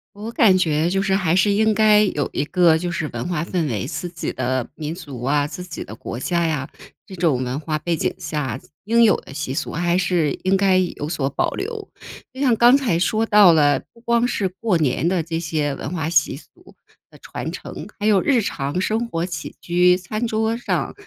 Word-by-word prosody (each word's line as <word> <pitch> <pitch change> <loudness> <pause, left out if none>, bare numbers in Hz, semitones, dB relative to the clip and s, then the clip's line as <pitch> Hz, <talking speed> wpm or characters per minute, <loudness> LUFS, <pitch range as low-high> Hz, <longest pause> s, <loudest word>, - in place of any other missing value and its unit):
我 215 +3 -6
感 210 -5 +4
觉 160 -3 +1
就 195 +1 +1
是 195 -1 +1
还 180 -3 +1
是 205 +2 +3
应 220 +2 +3
该 215 -1 +5
有 150 -8 -1
一 145 - -1
个 170 -2 +4
就 175 +1 -3
是 160 -3 -2
文 - - -4
化 175 -3 -1
氛 170 -2 -1
围， 120 -1 -3
自 175 +2 -4
己 170 -1 -4
的 130 -1 -2
民 155 0 -4
族 145 -9 -9
啊、 145 +2 +1
自 165 +4 -7
己 180 -3 -7
的 110 - -10
国 120 - -7
家 170 +4 0
呀， 150 -4 -2 0.4
这 190 - -9
种 160 -8 +1
文 130 +3 -3
化 155 -1 -3
背 170 +1 -1
景 - - -1
下 135 -5 -3 0.2
应 230 +3 +3
有 220 - +5
的 - - -12
习 140 -2 -4
俗 - - -3
还 175 +2 0
是 175 -5 +1
应 190 +1 +2
该 190 -1 +3
有 175 -5 -2
所 150 -5 -1
保 - - 0
留。 430 0 -5 0.4
就 260 - -12
像 260 -4 +3
刚 240 +4 +6
才 230 -12 0
说 215 +5 +1
到 205 -5 +6
了， 145 -2 +3
不 230 - -21
光 235 0 +2
是 205 -5 -1
过 190 +1 -1
年 155 +1 0
的 175 -3 +1
这 165 0 -3
些 155 -3 -1
文 135 - -6
化 160 -4 -2
习 150 -4 +2
俗 - - -16 0.6
的 - - -17
传 - - -6
承， - - -8
还 205 - -3
有 205 -4 +4
日 270 -4 +3
常 145 -2 -3
生 225 +4 -1
活 165 +1 -2
起 175 -2 -6
居、 180 +1 +3
餐 215 +6 -3
桌 220 0 0
上， 240 - -2
175 Hz, 235 characters per minute, -21 LUFS, 150-205 Hz, 0.6 s, 刚